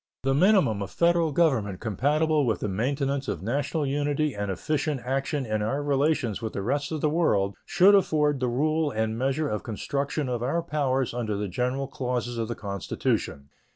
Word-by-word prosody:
The 135 0 +2
minimum 145 - +3
of 100 - -4
Federal 170 -2 +2
government 130 - +1
compatible 150 - +1
with 110 - 0
the - - -1
maintenance 135 +6 -1
of 85 - -3
national 140 - -1
unity 145 +1 0
and 100 -1 -3
efficient 150 - -1
action 135 +2 -1
in 110 -1 -1
our 135 +7 -1
relations 140 -6 +1
with 110 -1 -4
the 100 - -3
rest 145 +7 -1
of 155 -2 -3
the - - +2
world 100 - +1
should 195 +3 +5
afford 150 -7 +3
the 125 - 0
rule 155 +5 +1
and 110 -2 -1
measure 135 +5 0
of 105 -6 -2
construction 140 +6 -3
of 120 -2 -2
our 150 +7 0
powers 135 -6 0
under 110 -4 -2
the 105 0 -2
general 125 +7 -2
clauses 125 -3 -3
of 115 - -1
the 120 - -4
Constitution. 100 -8 -3
135 Hz, 185 wpm, -26 LUFS, 110-150 Hz, -, should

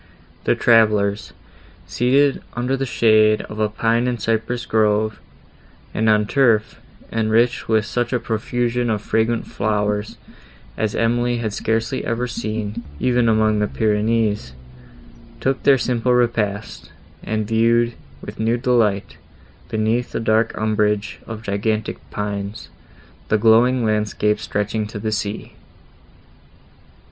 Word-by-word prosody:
The - - +3
travellers, 105 -3 +3 0.5
seated 135 +3 +2
under 125 +2 0
the 135 0 -3
shade 110 -2 +3
of 105 - -9
a 105 -1 +1
pine 115 +3 +1
and 120 -2 -2
cypress 115 +3 -1
grove 110 0 +1 0.7
and 110 0 +1
on 105 -1 +3
turf, 115 -3 +1 0.3
enriched 115 +2 +1
with 110 -1 +2
such 120 +1 -2
a 125 - +1
profusion 120 +2 -1
of 105 -2 -1
fragrant 115 +1 0
flowers, 105 0 -2 0.6
as 110 -2 -2
Emily 120 +1 +1
had 110 -3 -3
scarcely 115 +5 -1
ever 115 +1 -1
seen, 110 -4 -4 0.2
even 125 -2 +2
among 110 -1 +2
the 105 - +1
Pyrenees, 105 - 0 0.9
took 135 0 -1
their 140 -1 +5
simple 125 0 +1
repast, 110 -4 -1 0.3
and 110 -1 -2
viewed, 115 +1 +2 0.3
with - - -9
new 115 +2 +1
delight, 115 -5 +1 0.5
beneath 110 +3 -1
the - - -1
dark 110 0 +1
umbrage 105 -1 0
of 110 -1 -7
gigantic 110 +1 -2
pines, 100 0 -5 0.6
the 110 - +3
glowing 115 +3 +4
landscape 105 0 0
stretching 105 +1 -2
to 105 - -8
the 110 +1 -3
sea. 105 0 -4
110 Hz, 125 wpm, -20 LUFS, 105-120 Hz, 0.9 s, their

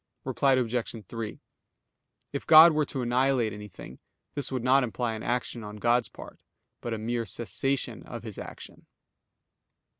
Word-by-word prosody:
Reply 135 -1 +2
Obj. 120 -3 -1
3: 115 -2 -6 0.9
If 140 - -4
God 160 +1 +10
were 150 -1 +2
to 130 - -3
annihilate 125 -2 +2
anything, 105 -10 -10 0.3
this 140 -2 -2
would 130 -3 -2
not 130 +2 +4
imply 120 -1 -2
an 110 - -6
action 120 -1 -2
on 105 0 -8
God's 120 +3 +2
part; - - -12 0.4
but 115 -1 -3
a - - -4
mere 115 +2 -2
cessation 135 +3 -2
of - - -7
His - - -8
action. - - -10
120 Hz, 150 wpm, -28 LUFS, 115-135 Hz, 0.9 s, God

